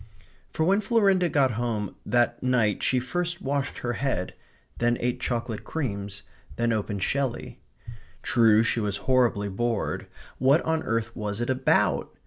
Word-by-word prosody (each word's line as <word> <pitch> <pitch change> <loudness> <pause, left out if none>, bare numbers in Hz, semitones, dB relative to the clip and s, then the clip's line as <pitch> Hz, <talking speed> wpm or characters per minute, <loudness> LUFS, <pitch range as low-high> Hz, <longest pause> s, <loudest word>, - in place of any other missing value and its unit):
For 160 - -1
when 195 +5 +3
Florinda 195 -5 +3
got 135 -4 +3
home 110 -3 -2
that 120 +2 +1
night 120 -6 +1
she 130 - +2
first 175 +7 -2
washed 140 -5 -2
her 120 0 -2
head; 120 -8 -2 0.5
then 120 0 +2
ate 125 +1 -1
chocolate 115 -3 -3
creams; 100 -9 -4 0.3
then 120 -1 +1
opened 105 -3 -2
Shelley. 135 -3 -2 0.6
True, 115 -3 +4
she 115 - 0
was 105 -2 -1
horribly 120 -6 +2
bored. 115 +3 -2 0.3
What 135 +5 +4
on 160 0 0
earth 115 -1 -2
was 105 -1 -4
it 120 +2 0
ABOUT? 130 - +1
120 Hz, 145 wpm, -26 LUFS, 110-140 Hz, 0.6 s, True